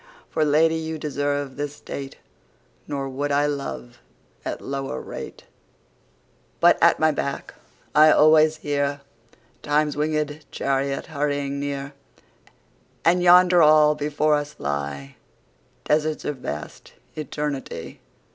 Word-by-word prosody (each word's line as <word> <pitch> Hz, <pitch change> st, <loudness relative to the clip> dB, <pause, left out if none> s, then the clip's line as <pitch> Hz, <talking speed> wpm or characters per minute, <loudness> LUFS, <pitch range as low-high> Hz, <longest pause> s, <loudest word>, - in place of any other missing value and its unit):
For 155 Hz, -, +1 dB
Lady 155 Hz, +2 st, +3 dB
you 160 Hz, 0 st, -4 dB
deserve 145 Hz, -2 st, -3 dB
this 145 Hz, 0 st, -4 dB
State; 135 Hz, -2 st, -8 dB, 0.7 s
Nor 140 Hz, -1 st, -3 dB
would 140 Hz, +2 st, -3 dB
I 145 Hz, +1 st, +2 dB
love 135 Hz, -, -5 dB, 0.4 s
at -, -, -4 dB
lower 135 Hz, -, -4 dB
rate. -, -, -8 dB, 1.2 s
But -, -, +5 dB
at -, -, +5 dB
my 155 Hz, 0 st, +4 dB
back 140 Hz, -1 st, -4 dB, 0.4 s
I 155 Hz, +1 st, +7 dB
alwaies 155 Hz, 0 st, +5 dB
hearTimes 140 Hz, 0 st, -3 dB
winged 150 Hz, 0 st, -2 dB
Charriot 135 Hz, 0 st, -1 dB
hurrying 145 Hz, -2 st, -2 dB
near:And 140 Hz, -, -5 dB
yonder 180 Hz, 0 st, +6 dB
all 150 Hz, -1 st, +6 dB
before 150 Hz, 0 st, 0 dB
us 145 Hz, 0 st, -1 dB
lyeDesarts 70 Hz, -, -4 dB
of 150 Hz, -, -3 dB
vast 75 Hz, -, -7 dB, 0.2 s
Eternity. 150 Hz, -2 st, -5 dB
145 Hz, 105 wpm, -23 LUFS, 140-155 Hz, 1.2 s, I